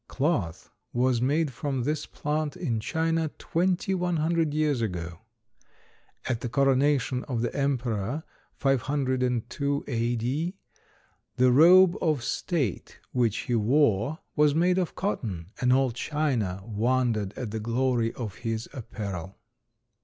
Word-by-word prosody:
Cloth 130 - -1 0.2
was 125 -1 +2
made 145 +3 +1
from 135 0 -2
this 150 +3 -2
plant 150 0 -2
in 120 -10 -1
China 160 +6 0
twenty 180 +2 0
one 180 -1 0
hundred 160 0 +1
years 150 -4 +1
ago. 85 -5 -4 1.1
At 120 -1 -1
the 120 - -3
coronation 135 0 +2
of 120 -3 -2
the 120 - -2
emperor, 130 -1 -1 0.3
502 135 0 0
A.D., 120 - -1 0.8
the 125 0 +4
robe 175 +6 +7
of 155 -7 +1
state 145 - -2
which 120 -4 +1
he 125 - -1
wore 115 +2 +2 0.2
was 150 -1 +4
made 180 +3 +3
of 180 - -2
cotton, 100 - -3
and 125 0 +3
all 130 -1 +3
China 120 - -1
wondered 115 -2 0
at 120 -5 -4
the 110 - -3
glory 120 +1 0
of 110 -6 -6
his 115 -1 -3
apparel. 100 -6 -6
130 Hz, 125 wpm, -27 LUFS, 115-150 Hz, 1.1 s, robe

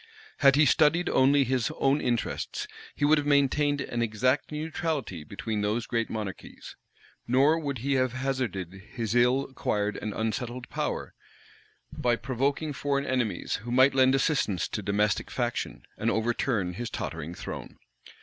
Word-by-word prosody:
Had 140 -2 +6
he 150 +1 +5
studied 150 +8 +3
only 140 +2 +4
his 125 -2 0
own 135 +2 +2
interests, 120 -2 -2 0.3
he 145 - +1
would 150 +1 +5
have 145 - -3
maintained 145 0 +3
an 120 - -3
exact 120 +6 +1
neutrality 150 - -3
between 105 +7 -4
those 110 +3 0
great 115 -1 -1
monarchies; 105 -4 -7 0.5
nor 140 +6 +4
would 140 -4 -3
he 135 +5 -1
have 130 -2 +1
hazarded 130 -9 -2 0.2
his 115 -4 -2
ill 125 +3 +4
acquired 105 -6 -2
and 105 - -4
unsettled 120 +3 -3
power - - -3 0.8
by 120 -1 +1
provoking 135 +5 -1
foreign 140 0 -1
enemies 125 -5 -1
who 115 +5 -9
might 130 +2 +5
lend 130 0 +5
assistance 130 - +1
to 105 - -3
domestic 105 +1 0
faction, 120 -2 -3 0.2
and 115 - +1
overturn 110 -4 0
his 120 +5 -4
tottering 80 -2 -5
throne. - - -7
125 Hz, 150 wpm, -28 LUFS, 110-140 Hz, 0.8 s, Had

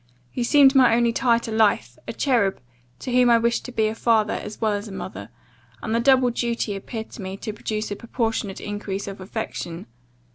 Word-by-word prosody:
You 245 - -1
seemed 275 +2 +6
my 255 -4 +5
only 235 -1 +2
tie 235 -1 +3
to 230 -1 -5
life, 220 -1 +1
a - - -4
cherub, 230 -9 +1 0.4
to 255 - -6
whom 250 0 +4
I 235 - +6
wished 235 +1 0
to 250 - -6
be 220 -2 +1
a 215 - 0
father, 225 -2 +2
as 210 0 -6
well 220 -1 +1
as 205 +2 -4
a - - -9
mother; 100 - -7 0.5
and 220 - -2
the 230 - +2
double 255 0 +4
duty 235 -3 -2
appeared 220 +3 -7
to - - -9
me 190 0 -6
to 215 - -5
produce 215 0 -4
a - - -2
proportionate 225 -3 -3
increase 205 -1 -5
of 195 -1 -7
affection. 185 -4 -5
225 Hz, 210 wpm, -23 LUFS, 205-235 Hz, 0.5 s, seemed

